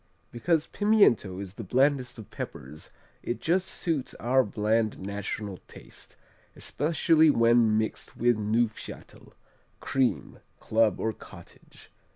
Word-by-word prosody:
_ - - -40 0.3
Because 160 +6 0
pimiento 200 - +2
is 95 -2 -7
the 115 - -8
blandest 130 +3 +1
of 110 - -11
peppers, 70 +4 -8 0.3
it 120 - -4
just 180 +3 0
suits 160 -8 -3
our 130 +2 +2
bland 110 +1 0
national 100 0 -5
taste, - - -13 0.4
especially 160 +1 +2
when 115 -4 +4
mixed 110 0 -4
with 120 0 +3
Neufchâtel, 110 +1 -3 0.5
cream, 130 -2 -1 0.2
club 110 -2 +1
or 110 - -1
cottage. - - -16
115 Hz, 120 wpm, -27 LUFS, 105-140 Hz, 0.5 s, when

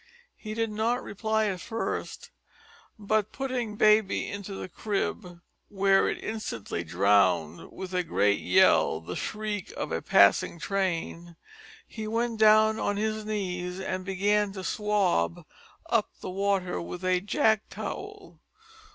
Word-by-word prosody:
He 215 -1 -7
did 225 -1 -1
not 230 +4 0
reply 220 +1 -1
at 190 -4 -2
first, 245 - -4 0.7
but 215 0 0
putting 255 -5 -3
baby 215 -1 +3
into 200 -1 -6
the - - -6
crib 180 -3 -3 0.3
where 195 -1 +3
it - - -5
instantly 115 - -4
drowned 90 -2 +2
with 190 -1 -8
a 180 - +2
great 105 - +1
yell 80 - +4
the 85 +2 -7
shriek 210 -2 -4
of - - -4
a - - -1
passing 100 +10 +4
train 175 -2 -3 0.5
he 220 -1 -6
went 230 0 -1
down 220 0 +5
on 205 - -1
his 215 0 -2
knees 180 -4 -3
and 185 -1 -3
began 200 +2 +1
to 190 -2 -7
"swab" 190 - 0 0.4
up - - +1
the - - -6
water 195 -1 0
with 180 +2 -7
a 185 -1 +2
jack 220 +1 +1
towel. - - -7
200 Hz, 135 wpm, -27 LUFS, 180-215 Hz, 0.7 s, down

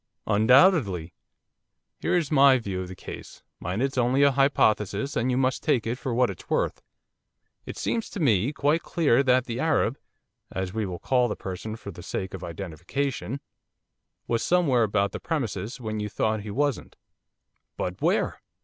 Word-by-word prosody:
'Undoubtedly. 110 - +4 0.9
Here - - 0
is 160 -4 -1
my 135 -2 +6
view 100 -6 -4
of 90 - -5
the 95 - -8
case, - - -10 0.2
mind 95 +8 -2
it 135 - +1
is 130 - -2
only 125 +3 +3
a 140 - +6
hypothesis 135 - +2
and 120 0 +1
you 125 - +1
must 130 -1 +1
take 130 -7 +1
it 115 +2 -2
for 130 - -3
what 120 -1 +2
it 90 - -10
is - - -22
worth. - - 0 0.9
It - - -6
seems 230 -1 -2
to - - -6
me 120 - +3
quite 150 +3 +1
clear 145 -7 +2
that 130 -2 +3
the 120 0 -4
Arab, 145 -5 +1 0.5
as 95 0 -3
we 110 -2 -1
will 90 -1 -5
call 125 +5 +2
the 105 - -3
person 95 +4 -6
for 100 -3 -8
the 85 - -11
sake 95 +2 -4
of 95 -1 -7
identification, 100 - -4 0.9
was 115 -1 0
somewhere 165 -9 +3
about 100 -2 +1
the - - -5
premises 120 - -3
when 110 -3 -4
you 105 0 -3
thought 110 +1 0
he 105 - -8
wasn't.' 140 +5 -1 0.8
'But - - -4
where? - - +1
120 Hz, 180 wpm, -26 LUFS, 100-140 Hz, 0.9 s, my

